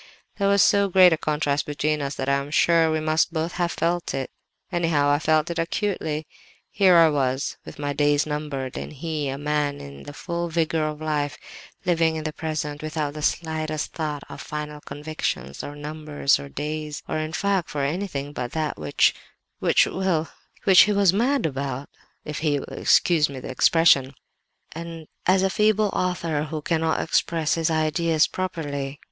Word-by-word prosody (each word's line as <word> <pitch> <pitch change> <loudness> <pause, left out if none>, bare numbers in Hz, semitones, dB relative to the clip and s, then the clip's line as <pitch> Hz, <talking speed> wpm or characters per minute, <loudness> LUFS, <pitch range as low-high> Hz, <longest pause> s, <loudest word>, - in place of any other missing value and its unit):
There 200 - +2
was 200 0 +5
so 200 -1 +4
great 185 -2 +7
a - - +3
contrast 150 -1 -1
between 150 +1 -1
us 140 0 -3
that 130 - -4
I 140 0 +3
am 140 +1 -4
sure 165 +2 +4
we 155 0 0
must 155 +2 +1
both 165 +1 -2
have 175 -1 -1
felt 170 -1 -1
it; 135 -1 -3 0.4
anyhow, 165 -5 +2
I 145 - +3
felt 155 +1 +2
it 170 - -3
acutely. 165 -3 -2 0.5
Here 175 -5 +6
was 135 -2 0
I, - - -25
with - - -9
my 145 0 -2
days 145 0 +2
numbered, 150 -4 -4
and - - -7
he, 150 -1 -3
a 135 - -3
man 145 0 -1
in 70 0 -10
the 145 - -9
full 170 +2 -4
vigour 160 -1 0
of 150 0 -6
life, 150 -2 -1 0.5
living 165 -2 +2
in 155 - -4
the 155 -1 -3
present, 150 -2 -4
without 155 -2 -3
the 150 - -7
slightest 155 -1 -2
thought 150 -3 -3
for - - -9
'final 150 -1 -6
convictions,' 145 - -4
or 145 - -7
numbers, 150 -1 0
or 140 - -8
days, 150 +1 -4
or, - - -2
in 155 0 -3
fact, 195 +1 0
for 145 -2 -2
anything 145 -2 -3
but 125 -3 -4
that 155 - -2
which 75 -2 +3 0.5
which—well, 180 -4 +1 0.3
which 190 -2 +8
he - - +3
was 200 -3 +4
mad 245 +2 +1
about, 140 -2 -3 0.4
if 150 0 -4
he 150 -2 +1
will - - -7
excuse 160 -4 +4
me 135 -2 -7
the 130 - -7
expression—as 165 +5 0
a 195 - +3
feeble 215 0 +3
author 165 -4 -1
who 155 0 -5
cannot 160 -1 +1
express 165 -1 +1
his 165 -1 +1
ideas 160 0 +2
properly. 145 -6 -4
155 Hz, 175 wpm, -24 LUFS, 145-170 Hz, 0.5 s, which